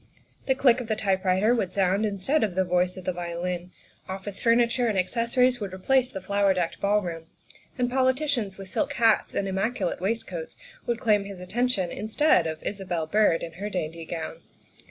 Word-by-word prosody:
The 265 - +3
click 255 -2 +4
of 240 - -7
the 220 - 0
typewriter 195 +1 +2
would 205 -7 0
sound 195 +2 +2
instead 210 +9 0
of 200 -5 -1
the 190 - +3
voice 180 +1 +1
of 185 - -9
the 185 - 0
vio 170 -1 -5
lin; 180 0 -3 0.4
office 190 +1 -6
furniture 235 +1 +3
and 210 -3 0
accessories 245 +6 +2
would 200 -3 -4
replace 255 +6 +2
the 195 - -6
flower 200 0 +2
decked 175 -2 -2
ballroom; 180 -5 0 0.5
and 250 -1 +1
politicians 260 -4 0
with 195 -1 -8
silk 285 +9 -1
hats 225 -4 +2
and 195 - 0
immaculate 195 -1 -1
waistcoats 190 -5 -3 0.3
would 235 -1 0
claim 210 -4 +2
his 200 -2 -8
attention 200 -1 -1
instead 215 - +2
of 160 -1 -5
Isabel 185 -5 -3
Byrd 190 -1 +2
in 165 - -5
her 205 +1 -3
dainty 165 -3 -4
gown. 165 0 -6
200 Hz, 180 wpm, -26 LUFS, 180-235 Hz, 0.5 s, click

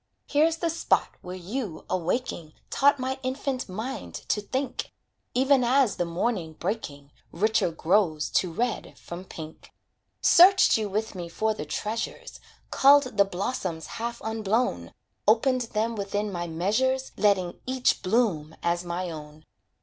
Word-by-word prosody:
Here's 315 +3 +2
the 335 0 -1
spot 330 - +1
where 180 0 -7
you, 185 0 -5
awaking, 175 -3 -2 0.2
Taught 285 +1 +4
my 260 +1 -3
infant 260 -2 -3
mind 220 +8 -5
to 210 - +1
think; 260 +4 -3 0.4
Even 265 0 +4
as 255 -1 +3
the 175 - 0
morning 170 -1 -2
breaking, 150 -7 -5 0.2
Richer 215 -1 +2
grows 165 -1 +1
to 180 - +1
red 240 +7 -2
from 175 +2 -8
pink. 160 -3 -10 0.5
Searched 380 +3 +7
you 215 -2 -1
with 215 +3 -2
me 175 -3 -6
for 220 +5 0
the 155 - -6
treasures, 215 +9 -4 0.3
Culled 275 -3 +5
the 200 -1 +5
blossoms 185 -4 -3 0.2
half 235 0 -3
unblown, 220 +2 -1 0.4
Opened 255 +4 +4 0.2
them 225 +2 +1
within 205 0 -2
my 175 -2 -3
measures, 220 +11 0
Letting 190 -4 +1
each 255 -1 +1
bloom 185 -7 0
as 170 +1 0
my 175 0 -3
own. 150 0 -10
210 Hz, 140 wpm, -26 LUFS, 175-255 Hz, 0.5 s, Searched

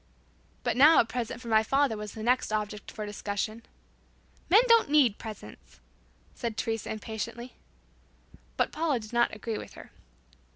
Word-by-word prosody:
But - - 0
now 295 +6 +7
a - - +4
present 240 0 -4
for 240 - -10
my 220 -1 +4
father 270 +1 +1
was 210 -1 -7
the 220 - -7
next 250 0 +1
object 210 -1 -3
for 215 - -6
discussion. 210 +2 -4 0.9
"Men 415 +7 +7
don't 460 -8 +5
need 275 -8 +4
presents," 205 - -11 0.5
said 230 -2 -5
Teresa 225 -1 -2
impatiently. 230 +3 -6 1.0
But - - +1
Paula 305 -5 0
did 215 +1 -11
not 240 0 +3
agree 215 +1 -4
with - - -10
her. - - -13
225 Hz, 155 wpm, -28 LUFS, 215-255 Hz, 1.0 s, now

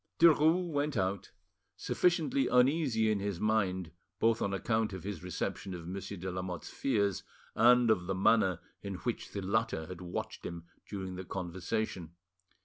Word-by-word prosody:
Derues 165 +2 +5
went 145 -1 0
out, 95 +1 -1 0.5
sufficiently 160 -7 +1
uneasy 125 -4 +3
in 105 - +1
his 100 -3 -3
mind, 95 -5 0 0.3
both 115 +2 +2
on 100 - 0
account 110 +2 0
of 95 - -6
his 100 -4 -5
reception 90 +1 -4
of 85 -1 -8
Monsieur 100 +2 -5
de 95 +1 -4
Lamotte's 90 -1 -5
fears 100 -8 0 0.3
and 120 0 +6
of 90 -5 +1
the 95 - -1
manner 95 -2 +4 0.2
in 100 -1 -5
which 120 +5 -3
the 100 - -4
latter 105 -4 0
had 90 0 -8
watched 90 -1 -5
him 85 -1 -6 0.2
during 95 -2 -5
the 95 - -5
conversation. 90 -1 -3
100 Hz, 155 wpm, -32 LUFS, 90-115 Hz, 0.5 s, and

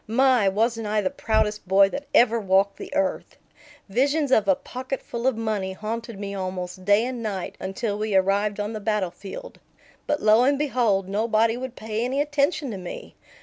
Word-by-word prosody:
My, 245 -2 +4
wasn't 225 +2 0
I 210 0 +1
the 185 - -1
proudest 215 -2 -1
boy 195 +1 +5
that 285 +6 -6
ever 235 -1 +4
walked 195 0 +2
the - - -8
earth! 290 -1 -1 0.5
Visions 280 +7 +1
of 215 -5 +4
a 190 - +5
pocketful 255 0 -5
of 260 -4 +1
money 210 -4 -2
haunted 225 +2 -5
me 200 -1 -5
almost 185 -1 -5
day 205 +3 +4
and 250 -2 -4
night 200 -5 -4
until 200 +2 -3
we 215 -2 -1
arrived 200 +2 +2
on 210 +2 -2
the 215 - -4
battle 210 -3 -1
field. 200 - -9 0.5
But 295 - +1
lo 215 +3 +5
and 280 +2 +3
behold, 240 -9 +1
nobody 220 +2 +1
would 255 0 -6
pay 220 +1 -3
any 260 +3 -1
attention 290 -1 0
to 200 - -5
me! 180 -1 -8
220 Hz, 185 wpm, -24 LUFS, 200-250 Hz, 0.5 s, boy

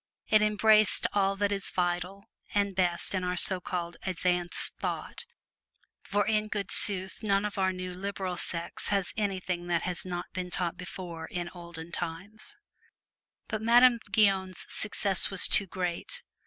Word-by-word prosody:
It 215 -1 +4
embraced 215 0 +4
all 195 -1 +2
that 200 0 0
is 195 -1 0
vital 180 +2 -2 0.3
and 200 -1 +1
best 175 -1 +2
in 185 -1 -1
our 180 0 -1
so 185 +1 +3
called 175 -2 -4
"advanced 180 -1 +1
thought"; - - -5 0.8
for 205 0 0
in 215 0 +1
good 205 -2 -3
sooth 190 -1 +4
none 200 -2 +1
of 205 -1 -4
our 190 0 +2
new 185 0 -6
"liberal 190 -1 -4
sects" 170 -1 -2
has 200 -2 0
anything 185 -4 -2
that 170 -1 0
has 180 -1 +3
not 175 -1 -4
been 180 -1 -4
taught 180 -1 -2
before 175 -3 -8
in 175 -1 -4
olden 170 -2 -9
time. 180 +5 -5 1.1
But 215 -1 -3
Madame 240 +1 +6
Guyon's 195 -3 +2
success 200 -3 0
was 195 -2 +3
too 200 - +4
great. 180 - -4
190 Hz, 155 wpm, -29 LUFS, 175-205 Hz, 1.1 s, Madame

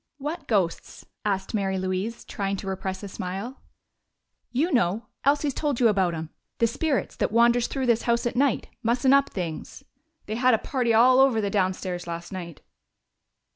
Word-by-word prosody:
"What 295 +2 -5
ghosts?" 190 -7 -1 0.2
asked 195 0 -1
Mary 195 -3 0
Louise, 185 +5 -3
trying 200 -2 -2
to 195 - -7
repress 190 0 -4
a - - -4
smile. 195 +6 -6 0.9
"You 300 +8 +1
know. 220 -2 +1 0.2
Elsie's 285 0 +2
told 290 -4 -1
you 240 -3 +5
about 190 -5 +1
'em. 160 0 -6 0.3
The 230 - +3
spirits 275 +4 -1
that - - 0
wanders 235 +1 +4
through 265 -2 -2
this 235 -2 +3
house 235 0 +1
at 240 - -1
night, 270 -1 +1
mussin' 245 +3 +3
up 275 0 +4
things. 170 -5 -6 0.4
They 215 +2 -4
had 250 -1 +4
a - - 0
party 245 0 -1
all 250 +3 +6
over 265 -4 +5
the 200 -2 -1
downstairs 185 -2 -1
last 170 0 -6
night." 175 -4 -7
225 Hz, 175 wpm, -25 LUFS, 190-255 Hz, 0.9 s, all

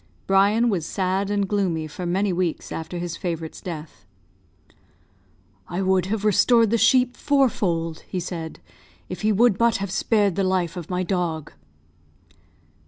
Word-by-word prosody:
Brian 200 +5 +3
was 185 -7 -1
sad 190 +1 -1
and 200 -1 0
gloomy 185 -6 0
for 175 +4 -6
many 190 +2 +1
weeks 175 -2 -2
after 160 +2 -5
his 175 -1 -4
favourite's 165 -3 -5
death. 160 - -8 1.6
"I 180 +2 -2
would 185 -1 +2
have 210 +1 -2
restored 225 +2 +4
the 230 - +3
sheep 250 +2 +4
fourfold," 195 - 0
he 185 - -3
said, 165 -2 -6 0.5
"if 180 - -6
he 215 0 +2
would 215 -1 +3
but 235 0 +3
have 200 -2 -4
spared 205 -1 +2
the 195 - 0
life 185 -3 0
of 175 -3 -7
my 180 0 -1
dog." 170 -4 -2
190 Hz, 150 wpm, -23 LUFS, 175-205 Hz, 1.6 s, restored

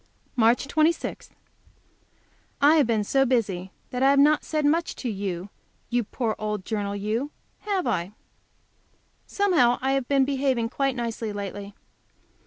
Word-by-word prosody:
March 240 +2 +3
26. 315 +3 0 1.3
I 300 +3 +6
have 285 -6 +4
been 220 -3 +1
so 270 +6 +2
busy 200 -8 0 0.2
that 250 - -3
I 270 - +5
have 280 - +4
not 295 +2 +5
said 305 -2 -1
much 325 +3 +1
to 245 - -3
you, 195 -1 -4 0.4
you 240 0 +2
poor 220 +1 -2
old 210 -3 -3
journal, 205 -2 -2
you, 215 +7 -2 0.3
have 395 -4 -1
I? 175 +3 -1 1.1
Somehow 330 -12 +3
I 265 +1 0
have 270 -2 0
been 275 -1 +3
behaving 265 -4 0
quite 275 +1 0
nicely 230 -2 -3
lately. 200 0 -6
245 Hz, 145 wpm, -25 LUFS, 210-280 Hz, 1.3 s, I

